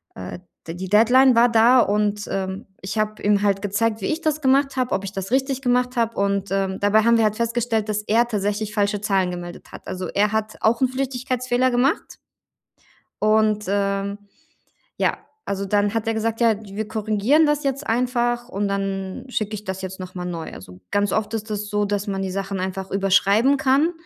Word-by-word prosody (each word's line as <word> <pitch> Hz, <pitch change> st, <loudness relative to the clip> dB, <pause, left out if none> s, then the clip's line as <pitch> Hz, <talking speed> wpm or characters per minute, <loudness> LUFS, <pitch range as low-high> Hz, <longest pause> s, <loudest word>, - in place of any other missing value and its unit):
äh, 95 Hz, -, -7 dB, 0.3 s
de 165 Hz, -, -5 dB
die 185 Hz, +1 st, -5 dB
Deadline 245 Hz, +6 st, +5 dB
war 235 Hz, +1 st, +5 dB
da 235 Hz, +2 st, +5 dB
und, 210 Hz, -1 st, 0 dB
ähm, 190 Hz, 0 st, -3 dB, 0.2 s
ich 195 Hz, +3 st, -4 dB
habe 215 Hz, 0 st, -1 dB
ihm 205 Hz, 0 st, +2 dB
halt 200 Hz, -1 st, +1 dB
gezeigt, 215 Hz, +2 st, 0 dB
wie 190 Hz, -, -3 dB
ich 315 Hz, +1 st, -1 dB
das 310 Hz, -2 st, -1 dB
gemacht 275 Hz, 0 st, +2 dB
habe, 255 Hz, -1 st, -1 dB
ob 190 Hz, +1 st, -2 dB
ich 195 Hz, -, -5 dB
das 195 Hz, 0 st, -5 dB
richtig 265 Hz, 0 st, +1 dB
gemacht 250 Hz, 0 st, +1 dB
habe. 230 Hz, -1 st, +1 dB
Und, 200 Hz, 0 st, 0 dB
ähm, 195 Hz, -1 st, -1 dB
dabei 205 Hz, +2 st, +4 dB
haben 235 Hz, +1 st, +4 dB
wir 225 Hz, -, +3 dB
halt 215 Hz, 0 st, +1 dB
festgestellt, 230 Hz, -1 st, -1 dB
dass 210 Hz, 0 st, -1 dB
er 230 Hz, +3 st, +2 dB
tatsächlich 210 Hz, -1 st, -2 dB
falsche 205 Hz, -1 st, 0 dB
Zahlen 195 Hz, -3 st, +1 dB
gemeldet 175 Hz, 0 st, -8 dB
hat. -, -, -11 dB
Also, 185 Hz, -1 st, -4 dB
er 205 Hz, +4 st, +1 dB
hat 220 Hz, 0 st, -2 dB
auch 230 Hz, +1 st, +2 dB
'n 260 Hz, -, +3 dB
Flüchtigkeitsfehler 255 Hz, -1 st, -1 dB
gemacht 255 Hz, +5 st, 0 dB, 1.1 s
und, 215 Hz, 0 st, +2 dB
ähm, 200 Hz, 0 st, -1 dB, 0.8 s
ja. -, -, +1 dB, 0.3 s
Also, 200 Hz, 0 st, -2 dB
dann 205 Hz, +1 st, +1 dB
hat 225 Hz, -1 st, -1 dB
er 225 Hz, -, +1 dB
gesagt: 225 Hz, +1 st, -2 dB
„Ja, 230 Hz, -2 st, +4 dB
d 205 Hz, -2 st, -11 dB
wir 215 Hz, +1 st, -3 dB
korrigieren 220 Hz, +7 st, +2 dB
das 295 Hz, 0 st, +1 dB
jetzt 275 Hz, +1 st, -2 dB
einfach 240 Hz, 0 st, 0 dB
und 205 Hz, -3 st, -2 dB
dann 195 Hz, +1 st, -3 dB
schicke 215 Hz, -4 st, -2 dB
ich 210 Hz, 0 st, -7 dB
das 190 Hz, -1 st, -5 dB
jetzt 190 Hz, 0 st, -6 dB
nochmal 185 Hz, -1 st, -6 dB
neu.“ 170 Hz, -2 st, -5 dB
Also, 90 Hz, -1 st, -12 dB
ganz 205 Hz, 0 st, +1 dB
oft 215 Hz, 0 st, -1 dB
ist 220 Hz, 0 st, -4 dB
es 210 Hz, 0 st, -3 dB
so, 210 Hz, 0 st, +1 dB
dass 205 Hz, 0 st, -2 dB
man 195 Hz, -1 st, -2 dB
die 190 Hz, -, -3 dB
Sachen 195 Hz, 0 st, -3 dB
einfach 190 Hz, +1 st, -4 dB
überschreiben 200 Hz, +7 st, +3 dB
kann 280 Hz, +4 st, +3 dB
210 Hz, 200 wpm, -22 LUFS, 195-240 Hz, 1.1 s, Deadline